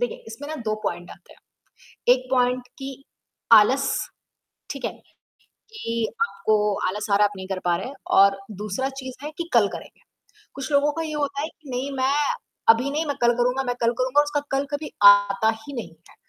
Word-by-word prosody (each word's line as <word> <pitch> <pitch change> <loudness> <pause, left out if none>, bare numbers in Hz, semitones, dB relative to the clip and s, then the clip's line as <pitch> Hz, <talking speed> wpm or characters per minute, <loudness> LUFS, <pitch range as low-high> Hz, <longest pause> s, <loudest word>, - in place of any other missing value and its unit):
देखिए, 245 - -3
इसमें 230 +7 -8
ना 315 - -4
2 215 - +1
पॉइंट 175 +1 -4
आते - - -15
हैं, - - -23 0.7
1 255 0 -4
पॉइंट 250 0 +1
कि 270 0 -8 0.5
आलस 260 +6 +6 0.8
ठीक 275 -4 -6
है, - - -1 0.8
कि 230 - -3 0.2
आपको 210 +1 +1
आलस 210 +3 -4
आ 200 - +5
रहा 210 - +4
है, - - +5
आप 205 - -12
नहीं 190 - -7
कर 190 -1 -3
पा 175 - +3
रहे 190 - -5
हैं 280 - -9 0.2
और 195 0 +6 0.2
दूसरा 215 +6 -2
चीज़ 260 -1 -7
है 300 - -5
कि 340 0 -4
कल 220 -4 +5
करेंगे। - - -11 0.5
कुछ 275 +1 -5
लोगों 285 +1 +3
का 330 - -4
ये 310 -1 -5
होता 285 -1 -2
है 310 - -2
कि 315 -4 -18
नहीं 260 +3 -3
मैं 265 +2 +2 0.6
अभी 235 +4 +5
नहीं 310 +2 -1
मैं 285 - -1
कल 240 0 +5
करूँगा 250 +2 +1
मैं 245 -1 -2
कल 230 0 +3
करूँगा 260 +3 +3
उसका 290 0 -1
कल 275 +1 +1
कभी 295 +1 -4 0.2
आता 200 +1 +2 0.2
ही 285 - -8
नहीं 235 - -5 0.2
है, - - -19
250 Hz, 205 wpm, -24 LUFS, 210-280 Hz, 0.8 s, आलस